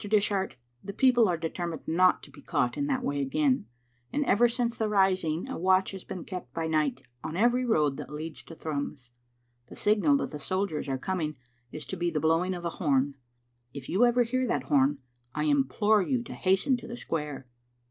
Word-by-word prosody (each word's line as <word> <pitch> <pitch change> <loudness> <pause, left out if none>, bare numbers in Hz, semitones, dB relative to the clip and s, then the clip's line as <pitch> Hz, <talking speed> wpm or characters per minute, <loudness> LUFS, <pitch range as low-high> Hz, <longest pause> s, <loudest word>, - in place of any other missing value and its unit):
Dish 210 -1 +3
art, 190 -1 -1 0.3
the 200 - -6
people 240 -3 +4
are 175 - +1
determined 165 -1 -4
not 185 +3 +3
to 140 - -12
be 145 - -14
caught 120 0 0
in 285 - -1
that 260 -3 -1
way 145 0 -1
again, 135 -4 +1 0.4
and 290 0 0
ever 240 +2 +4
since 235 0 -1
the 220 -1 -1
rising 185 -5 +2
a - - -5
watch 185 +2 +3
has 190 -2 -8
been 180 - -6
kept 180 -10 -7
by 165 -1 -1
night 150 -5 0 0.2
on 160 +2 -4
every 240 +4 +3
road 150 - +2
that - - -7
leads 155 +1 -6
to 165 - -10
Thrums. 140 -5 -5 0.6
The - - -11
signal 215 +7 +3
that - - -3
the 150 - -6
soldiers 185 -3 -2
are 135 - 0
coming 155 0 -2 0.4
is 150 - -6
to 190 - -5
be 175 0 0
the 155 -2 -1
blowing 165 +4 +2
of 175 -1 -7
a - - +1
horn. 140 -3 +2 0.6
If 140 -2 -8
you 195 +7 +3
ever 245 0 +4
hear 255 +2 -1
that 145 - 0
horn, 140 +1 +3 0.4
I 150 - 0
implore 150 +9 +3
you 240 +6 0
to - - -8
hasten 195 +8 +2
to 240 - -10
the 240 - -6
square." 150 - -4
175 Hz, 210 wpm, -28 LUFS, 150-210 Hz, 0.6 s, people